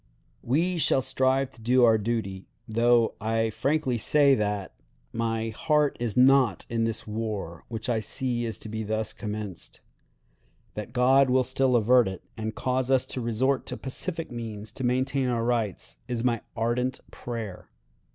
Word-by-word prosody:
"We 170 +8 +1
shall 135 -3 +3
strive 130 +1 +1
to 115 - -18
do 125 +3 +4
our 110 -2 +5
duty, 100 -4 -3 0.2
though 115 +1 +3
I 115 +1 0
frankly 135 -1 0
say 140 +4 +4
that 105 -4 -1 0.4
my 115 0 -1
heart 150 +5 +1
is 120 -3 -3
not 130 -5 +4
in 115 -1 +1
this 115 0 -3
war, 105 -6 -4
which 110 -2 -5
I 120 -3 +1
see 120 +3 -2
is 115 - -4
to - - -4
be 110 +1 -4
thus 110 0 -2
commenced. 105 -4 -6 0.9
That 105 +2 -6
God 130 +2 +4
will 130 0 +4
still 130 0 +1
avert 120 +1 +5
it, 95 -1 -6
and 110 -1 -4
cause 130 0 -1
us 130 -1 +3
to 130 - -3
resort 125 +4 0
to - - -4
pacific 165 +4 -5
means 110 -3 -6
to 130 - -7
maintain 130 +2 +1
our 120 -2 0
rights, 115 -5 -2
is 120 -2 -2
my 120 -3 +1 0.2
ardent 125 +3 0
prayer! 115 -6 -6
120 Hz, 160 wpm, -27 LUFS, 110-130 Hz, 0.9 s, our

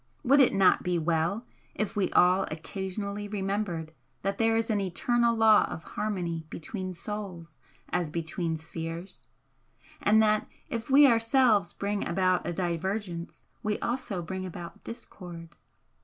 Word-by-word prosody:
Would 280 +2 +5
it 265 - +6
not 195 -1 +4
be 180 -1 0
well 170 +7 0 0.3
if 215 - -2
we 200 -2 +1
all 185 +2 +5
occasionally 200 +5 -4
remembered 195 -5 -2 0.3
that 195 +1 -1
there 225 0 +3
is 225 0 +1
an 205 -2 +1
eternal 235 +6 +1
law 220 -1 +6
of 165 - -6
harmony 175 -6 -3
between 185 +4 -5
souls 180 -4 -7 0.3
as 175 -3 0
between 165 +1 -2
spheres? 165 +3 -7 0.7
and 215 +1 +5
that 215 -1 +3 0.2
if 230 +1 -4
we 285 +2 +8
ourselves 230 -6 +4
bring 200 0 -2
about 185 0 +1
a - - 0
divergence 175 +1 -3 0.2
we 210 0 -1
also 235 -7 -3
bring 190 +3 -4
about 175 -2 -8
discord? 175 -7 -9
190 Hz, 140 wpm, -28 LUFS, 170-215 Hz, 0.7 s, we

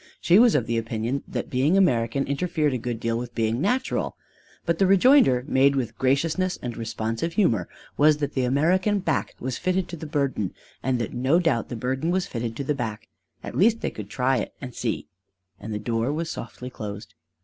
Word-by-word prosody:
She 180 +4 +5
was 240 -1 +6
of 125 -6 +2
the 115 0 0
opinion 115 +4 -2
that - - -4
being 140 +9 +3
American 130 -7 +2
interfered 150 0 0
a 125 - -1
good 120 -1 -4
deal 115 0 -1
with 120 0 -7
being 115 +2 0
natural. 250 +7 0 0.5
But 170 -1 0
the 195 - +4
rejoinder, 195 - +5
made 140 +1 +4
with 120 -4 -2
graciousness 160 - +1
and 120 -2 -5
responsive 115 +6 -3
humor, 115 - +2 0.3
was 150 0 +5
that 145 -1 -3
the 130 - 0
American 175 +11 +2
back 165 -6 -1
was 125 -1 -3
fitted 185 0 0
to 170 - -5
the 160 -1 -7
burden 135 -10 -1 0.3
and 130 -1 0
that 115 -3 -3
no 130 +6 +2
doubt 165 -10 +1
the - - -4
burden 130 +7 -1
was 185 +1 +1
fitted 115 -2 -4
to 140 - -3
the 150 - 0
back: 115 -6 -5 0.3
at - - -6
least 225 +4 +3
they - - -2
could 105 -2 -8
try 130 +2 +1
it - - -4
and 125 -3 -7
see 115 -2 -2 0.5
and 110 - -7
the 105 - -2
door 115 +4 -1
was 165 +2 -3
softly 125 +2 -7
closed. 105 -3 -7
130 Hz, 205 wpm, -25 LUFS, 115-165 Hz, 0.5 s, was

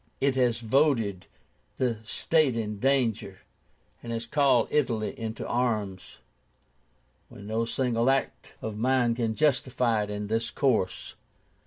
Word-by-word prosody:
It 140 0 +2
has 120 -3 +1
voted 115 -6 +1 0.5
the 120 -4 0
state 140 +3 +1
in 105 -2 -3
danger, 115 -7 0 0.6
and 120 - -7
has 115 0 -3
called 130 -2 +3
Italy 115 -7 0 0.2
to - - -6
arms, 110 -6 -2 1.1
when 100 - -12
no 110 +2 -1
single 120 0 0
act 135 0 -1
of 110 -1 -4
mine 125 +1 +2
can 115 -2 -1
justify 125 -6 +1
it 105 - -4
in 105 0 -4
this 115 +2 -1
course." 115 -9 0
115 Hz, 130 wpm, -27 LUFS, 110-130 Hz, 1.1 s, called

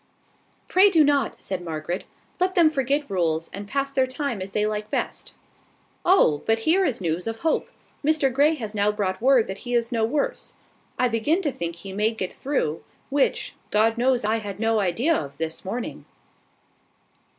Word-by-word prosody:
"Pray 385 +3 +6
do 330 -5 +5
not," 285 -4 +1
said 190 -2 -3
Margaret. 165 +2 -4 0.3
"Let 370 +1 +1
them 330 -3 +5
forget 280 +1 0
rules, 165 -4 -1
and 200 +1 -6
pass 275 +3 -1
their 265 -1 +2
time 255 -5 -3
as 190 - -4
they 210 +2 0
like 210 0 -3
best." - - -3 0.7
"Oh! 255 - +4
but 225 0 +2
here 340 +10 +3
is 245 - -1
news 170 +2 -2
of 225 0 -3
Hope. 325 - 0 0.3
Mr 290 -3 +2
Grey 295 +4 +4
has 220 -7 -5
now 205 0 +2
brought 195 -2 -2
word 255 -2 +5
that 190 +1 -6
he 245 -1 -3
is 235 -1 +1
no 230 -2 0
worse. 300 - -2 0.4
I 250 - +3
begin 270 - +1
to 290 - 0
think 170 -7 -4
he 190 +3 -9
may 210 +2 +2
get 185 -5 -4
through, 260 - -2 0.3
which, 280 -1 +1 0.2
God 220 +2 +3
knows 245 -1 +1
I 220 +2 +2
had 205 -3 -6
no 225 0 +2
idea 225 - +1
of 140 - -4
this 160 0 -4
morning." 225 +6 -5
225 Hz, 185 wpm, -24 LUFS, 195-280 Hz, 0.7 s, Pray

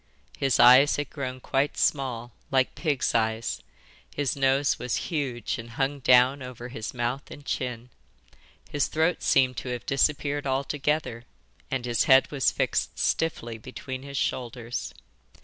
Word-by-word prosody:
His 135 -3 +2
eyes 130 +4 +7
had 145 -2 -4
grown 130 -3 -5
quite 135 +3 -1
small, 125 -4 0 0.2
like 130 -1 +2
pigs' 150 -6 -1
eyes, 110 0 0 0.5
his 145 -3 -1
nose 135 +1 +2
was 125 0 -2 0.2
huge 135 -9 -2
and 115 +1 -8
hung 140 +1 0
down 125 +2 +5
over 125 -1 -8
his 110 -3 -5
mouth 125 +2 -3
and 145 - -11
chin, 125 -2 -4 0.8
his 145 -3 0
throat 160 +3 0
seemed 130 -2 +3
to 130 - -5
have 125 -1 -4
disappeared 145 +1 0
altogether, 135 -2 -1 0.4
and 130 -2 -2
his 120 -2 +1
head 130 0 +5
was 140 -3 +2
fixed - - -1
stiffly 120 -8 -1
between 130 +3 -7
his 140 0 -7
shoulders. 120 -1 -3
130 Hz, 145 wpm, -26 LUFS, 120-140 Hz, 0.8 s, eyes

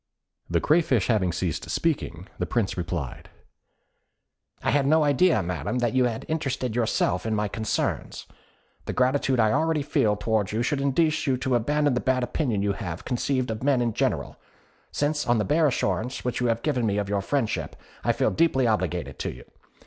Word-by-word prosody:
" - - -46
The - - +5
Crayfish 150 - +2
having 100 -6 +2
ceased 85 -2 -3
speaking, 100 - -1
the - - -1
Prince 115 -5 0
replied, 85 -6 -4 1.3
"I - - +2
had 140 -1 +2
no 155 +1 +4
idea, 145 - +3
Madam, 85 - -3
that 120 -1 0
you 130 -1 +3
had 115 -2 -3
interested 135 -7 -2
yourself 110 -5 +1
in 110 -1 -1
my 105 0 0
concerns. 110 +2 -2 0.6
The - - -3
gratitude 130 0 +2
I 110 -1 +4
already 160 +2 +1
feel 110 -7 +2
towards 105 -1 -1
you 115 +2 0
should 140 +2 0
induce 155 +3 +1
you 130 -2 +2
to 130 +1 -1
abandon 145 +4 +2
the 125 - +1
bad 130 0 +1
opinion 120 -6 -1
you 100 -1 +1
have 90 -6 -6
conceived 130 0 -1
of 110 - -5
men 135 -1 +2
in 120 -2 0
general, - - -1 0.5
since 150 +1 -1
on 120 0 +3
the 105 - 0
bare 155 +1 +3
assurance 120 0 -1
which 125 0 -1
you 125 - +2
have 115 0 0
given 130 -7 +1
me 100 -1 0
of 100 -1 -1
your 100 0 0
friendship, 120 +1 -2 0.3
I - - +3
feel - - +1
deeply 150 -6 +2
obliged 105 -7 -1
to - - -2
you. - - -12
120 Hz, 190 wpm, -25 LUFS, 105-140 Hz, 1.3 s, The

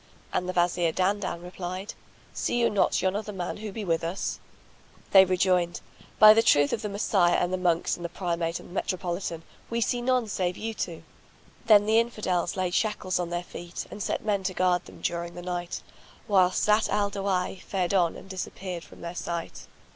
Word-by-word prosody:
And 180 - -1
the - - -1
Wazir 175 -1 +2
Dandan 185 -1 -1
replied, 180 +2 -6 0.4
"See - - -1
you 235 - +3
not 205 - +2
yon 185 +1 +1
other 210 0 -3
man 180 -3 -4
who 215 0 -6
be 210 +1 -5
with 165 -2 0
us?" 170 +4 -3 0.7
They 190 -1 +9
rejoined, 180 -1 +1 0.4
"By 215 0 +10
the 225 - +4
truth 145 -9 +4
of 220 - -1
the 210 - -3
Messiah 200 -3 +2
and 180 +1 0
the - - +1
Monks 175 -2 +1
and 175 - -10
the 170 - -3
Primate 170 -2 -2
and - - -13
the - - -12
Metropolitan, 175 -3 -3 0.3
we 235 - -1
see 240 +1 0
none 250 -2 +1
save 180 -3 -1
you 225 +1 -4
two!" 170 -6 -5 0.6
Then 205 -2 +7
the 220 +1 +4
Infidels 200 -7 -1
laid 185 -1 -1
shackles 210 -4 0
on 175 -1 -2
their 175 0 -2
feet 175 0 -7
and 205 - -7
set - - -2
men 205 -2 +1
to 185 -1 -1
guard 180 -1 +2
them - - -13
during 170 0 -3
the 175 - -7
night, 175 -1 -4 0.4
whilst 185 -4 +3
Zat 210 +1 +3
al 205 -1 +1
Dawahi 190 -2 -1
fared 185 -1 -2
on 175 -4 +3
and - - -11
disappeared 185 -2 -5
from - - -15
their 170 0 -5
sight. 170 -1 -5
185 Hz, 200 wpm, -27 LUFS, 175-205 Hz, 0.7 s, By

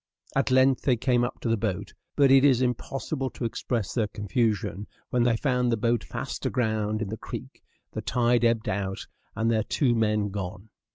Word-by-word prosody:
At 135 0 +2
length 130 0 +4
they 125 -3 +2
came 120 0 +2
up 120 - -3
to - - -2
the 115 - +3
boat; 100 -4 -3 0.2
but 140 -2 +5
it 135 0 +7
is 130 -3 +5
impossible 135 +2 -2
to 125 - -5
express 115 -2 -2
their 115 -4 +1
confusion 105 -2 -1 0.2
when 125 - +2
they 120 -1 +3
found 125 -2 +1
the 115 - +1
boat 115 +1 +1
fast - - -5
aground 110 -3 0
in 100 - -5
the 110 - -4
creek, - - -8 0.3
the - - -4
tide 120 -1 +2
ebbed 115 -2 +2
out, 95 0 -2 0.3
and 115 +1 +1
their 110 -1 +2
two 125 +2 +1
men 105 -2 +1
gone. 95 +1 -6
115 Hz, 190 wpm, -26 LUFS, 105-125 Hz, 0.3 s, it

